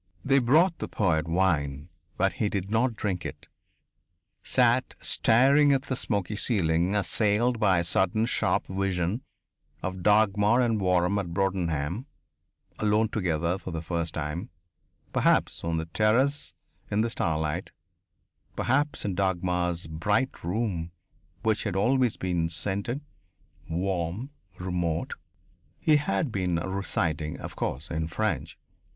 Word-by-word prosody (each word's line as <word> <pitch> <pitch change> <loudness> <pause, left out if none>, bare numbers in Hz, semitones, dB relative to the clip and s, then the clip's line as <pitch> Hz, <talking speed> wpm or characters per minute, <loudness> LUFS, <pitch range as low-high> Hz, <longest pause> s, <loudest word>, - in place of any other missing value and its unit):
They 135 0 +4
brought 160 +8 +3
the - - -3
poet 85 -5 0
wine 80 -4 0 0.3
but - - +2
he 105 - +2
did 100 0 -3
not 115 +1 +2
drink 95 -4 -2
it - - -8 0.9
sat 125 0 +2
staring 140 +5 +4
at 135 -1 +1
the 130 - -3
smoky 105 -4 -2
ceiling, 90 -4 +2
assailed 105 +5 +1
by 95 -4 +4
a 85 - +1
sudden 95 +5 +2
sharp 120 - 0
vision 95 +2 -1 0.6
of 95 0 -4
Dagmar 105 +3 +4
and 115 -4 +1
Waram 90 +1 +2
at 85 -4 -5
Broadenham, 90 - -1 0.7
alone 110 +1 +2
together 90 -3 -1
for 95 - -7
the 80 -2 -4
first 85 -1 -3
time, 80 +2 -4 0.6
perhaps - - +2
on 85 0 -1
the 80 - -2
terrace 115 - +1 0.3
in 105 - +1
the 115 - +1
starlight, 80 -2 -2 0.8
perhaps 140 +1 0
in 100 - -1
Dagmar's 90 -2 0
bright 105 +11 -1
room 90 -2 -2 0.5
which 110 -1 +1
had 100 -4 -2
always 125 +4 +2
been 85 -3 -1
scented, 100 - -1 0.7
warm, 90 - -2 0.3
remote 90 -3 -2 0.7
He 155 -1 +4
had 130 -2 -1
been 90 -4 0
reciting, 85 -4 -2
of - - -7
course, 70 +6 -3
in 80 -1 -1
French. 85 -3 -2
95 Hz, 130 wpm, -27 LUFS, 85-110 Hz, 0.9 s, They